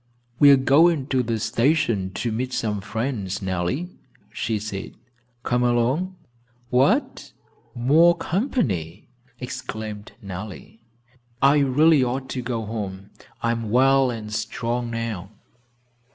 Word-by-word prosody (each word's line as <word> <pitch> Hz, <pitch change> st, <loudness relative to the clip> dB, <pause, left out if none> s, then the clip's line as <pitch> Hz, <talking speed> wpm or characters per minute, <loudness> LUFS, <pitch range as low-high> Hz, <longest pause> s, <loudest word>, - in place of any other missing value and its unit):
"We 145 Hz, -, +8 dB
are 140 Hz, -, +8 dB
going 145 Hz, +2 st, +4 dB
to 130 Hz, -1 st, +2 dB
the 115 Hz, -2 st, -1 dB
station 115 Hz, -5 st, +1 dB
to 120 Hz, -, -2 dB
meet 125 Hz, +3 st, -3 dB
some 105 Hz, -3 st, -1 dB
friends, 105 Hz, -3 st, -3 dB
Nellie," 95 Hz, -, -3 dB, 0.3 s
she 115 Hz, -1 st, -1 dB
said. 100 Hz, -2 st, -6 dB, 0.5 s
"Come 125 Hz, 0 st, +1 dB
along?" 125 Hz, +10 st, +1 dB, 0.6 s
"What! 180 Hz, -, +1 dB, 0.4 s
More 160 Hz, +8 st, +4 dB
company?" 120 Hz, -, -2 dB, 0.3 s
exclaimed 110 Hz, -4 st, -6 dB
Nellie. 100 Hz, +1 st, -9 dB, 0.6 s
"I 140 Hz, +2 st, +5 dB
really 145 Hz, +2 st, +4 dB
ought 130 Hz, +2 st, -3 dB
to 130 Hz, -, -3 dB
go 120 Hz, -2 st, -3 dB
home. 100 Hz, -3 st, -6 dB, 0.3 s
I 115 Hz, -, +2 dB
am 115 Hz, -2 st, -3 dB
well 135 Hz, +3 st, +4 dB
and 110 Hz, -3 st, -6 dB
strong 120 Hz, +2 st, -2 dB
now." 115 Hz, -5 st, -4 dB
120 Hz, 120 wpm, -23 LUFS, 105-135 Hz, 0.6 s, We